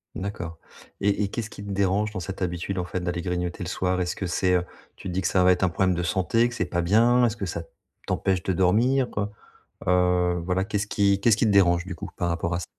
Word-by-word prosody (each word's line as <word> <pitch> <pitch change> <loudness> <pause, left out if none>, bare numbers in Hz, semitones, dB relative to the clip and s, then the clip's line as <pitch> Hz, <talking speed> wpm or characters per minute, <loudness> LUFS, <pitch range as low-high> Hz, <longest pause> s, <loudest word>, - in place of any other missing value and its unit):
D'accord 90 -4 -5 0.4
et 100 +1 +2
et - - 0
qu'est-ce 110 +1 -5
qui 100 - -9
te 100 - -7
dérange 100 +2 +1
dans - - -3
cette 95 +2 -6
habitude 90 +1 -2
en 90 - -2
fait 90 +1 -3
d'aller 90 -1 -3
grignoter 90 +1 -3
le 90 - -4
soir? 90 -1 0
Est-ce 90 - -2
que 95 - -4
c'est 90 +1 +1
heu, 90 - +2 0.3
tu - - -9
te 90 - -4
dis 95 - 0
que 90 - 0
ça 90 -1 +3
va 90 - +6
être 90 +1 +1
un 95 - +4
problème 95 +2 +1
de 90 - -1
santé, 105 +7 +1
que 120 - -8
c'est 120 - -1
pas 85 -1 -1
bien? 115 +7 +4
Est-ce 115 0 -1
que 100 - -3
ça 85 -1 -4 0.5
t'empêche 95 -2 0
de 95 - -1
dormir, 120 +9 +3
heu? 100 - 0 0.6
Heu, 90 -1 +2
voilà, 90 +1 0
qu'est-ce 100 0 -2
qui 100 -1 +2
qu'est-ce 110 0 +4
qui 110 - +1
te - - +3
dérange, 90 -3 +4
du 95 -3 -6
coup, - - -7
par 85 - -1
rapport 85 0 -1
à - - 0
ç - - -5
95 Hz, 265 wpm, -25 LUFS, 90-100 Hz, 0.6 s, va